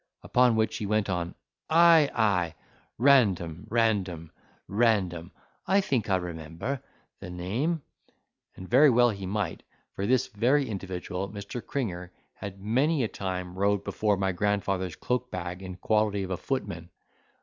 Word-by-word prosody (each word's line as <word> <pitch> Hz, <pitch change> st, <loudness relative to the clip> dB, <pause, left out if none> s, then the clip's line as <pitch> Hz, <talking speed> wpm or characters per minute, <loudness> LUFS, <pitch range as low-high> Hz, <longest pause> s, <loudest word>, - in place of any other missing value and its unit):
Upon 125 Hz, -2 st, +3 dB
which 110 Hz, 0 st, +1 dB
he 105 Hz, -, -3 dB
went 105 Hz, -1 st, +1 dB
on, 85 Hz, -1 st, -3 dB, 0.3 s
"Ay, 165 Hz, -2 st, +6 dB
ay, 90 Hz, -8 st, +1 dB, 0.4 s
Random, 100 Hz, -, +3 dB
Random, 100 Hz, -8 st, 0 dB, 0.4 s
Random—I 100 Hz, -, 0 dB
think 130 Hz, -, 0 dB
I 95 Hz, -, +4 dB
remember 85 Hz, -, -4 dB, 0.4 s
the -, -, -8 dB
name:" 115 Hz, -, -2 dB, 0.7 s
and 95 Hz, -, -9 dB
very 140 Hz, +7 st, +6 dB
well 120 Hz, -1 st, +5 dB
he 100 Hz, -2 st, -6 dB
might, 100 Hz, -3 st, -2 dB, 0.3 s
for 100 Hz, -, -3 dB
this 130 Hz, +1 st, +3 dB
very 130 Hz, +7 st, +2 dB
individual, 95 Hz, -2 st, -4 dB
Mr. 100 Hz, +3 st, -7 dB
Cringer, 90 Hz, -10 st, -4 dB, 0.2 s
had 100 Hz, -1 st, -8 dB
many 130 Hz, +8 st, +1 dB
a -, -, +1 dB
time 90 Hz, -3 st, -4 dB
rode 100 Hz, +1 st, +1 dB
before 105 Hz, -1 st, 0 dB
my 95 Hz, 0 st, 0 dB
grandfather's 95 Hz, -2 st, -1 dB
cloak 125 Hz, 0 st, -2 dB
bag, 90 Hz, -1 st, -5 dB
in 95 Hz, -1 st, -7 dB
quality 105 Hz, +1 st, +1 dB
of 95 Hz, -, -5 dB
a -, -, +1 dB
footman. 100 Hz, -10 st, -4 dB
100 Hz, 140 wpm, -28 LUFS, 90-120 Hz, 0.7 s, Ay